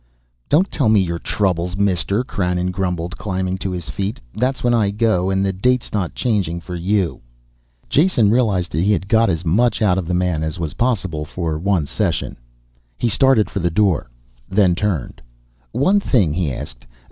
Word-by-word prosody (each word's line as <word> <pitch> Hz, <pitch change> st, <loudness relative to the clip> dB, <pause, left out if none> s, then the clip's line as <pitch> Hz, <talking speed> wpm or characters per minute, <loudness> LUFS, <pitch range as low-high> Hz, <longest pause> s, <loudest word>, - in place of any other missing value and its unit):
"Don't 180 Hz, +6 st, +3 dB
tell 130 Hz, -7 st, +1 dB
me 110 Hz, -1 st, +5 dB
your 85 Hz, -3 st, -1 dB
troubles, 90 Hz, -2 st, -1 dB
mister," 100 Hz, +3 st, +1 dB
Krannon 90 Hz, -6 st, -1 dB
grumbled, 90 Hz, -2 st, -3 dB
climbing 95 Hz, -2 st, -2 dB
to 95 Hz, -, -3 dB
his 90 Hz, -2 st, -5 dB
feet. 100 Hz, +1 st, -3 dB
"That's 125 Hz, +5 st, -1 dB
when 120 Hz, -1 st, +3 dB
I 110 Hz, -4 st, +2 dB
go 105 Hz, -3 st, +1 dB
and 95 Hz, 0 st, +1 dB
the 95 Hz, -, 0 dB
date's 125 Hz, +6 st, 0 dB
not 95 Hz, -5 st, -2 dB
changing 100 Hz, -9 st, 0 dB
for 90 Hz, +1 st, -9 dB
you." 90 Hz, +1 st, -1 dB, 0.7 s
Jason 140 Hz, -, +3 dB
realized 105 Hz, -7 st, +1 dB
he 90 Hz, +8 st, +2 dB
had 95 Hz, -, -2 dB
got 115 Hz, +1 st, +3 dB
as 85 Hz, 0 st, -2 dB
much 105 Hz, +6 st, +2 dB
out 95 Hz, -4 st, +2 dB
of 90 Hz, -, -5 dB
the 90 Hz, -, 0 dB
man 90 Hz, -3 st, 0 dB
as 80 Hz, +2 st, -3 dB
was 80 Hz, -3 st, -4 dB
possible 95 Hz, -11 st, -1 dB
for 80 Hz, 0 st, -3 dB
one 90 Hz, -3 st, +1 dB
session. 85 Hz, +3 st, -2 dB, 0.6 s
He 120 Hz, -, 0 dB
started 130 Hz, -1 st, +3 dB
for 100 Hz, -, -4 dB
the 85 Hz, -1 st, +1 dB
door, 95 Hz, -, +1 dB, 0.4 s
then 95 Hz, -2 st, +3 dB
turned. 90 Hz, -6 st, -2 dB, 0.5 s
"One 190 Hz, +10 st, +3 dB
thing," 105 Hz, -, +2 dB
he 80 Hz, -3 st, -1 dB
asked. -, -, -8 dB
95 Hz, 180 wpm, -20 LUFS, 90-110 Hz, 0.7 s, me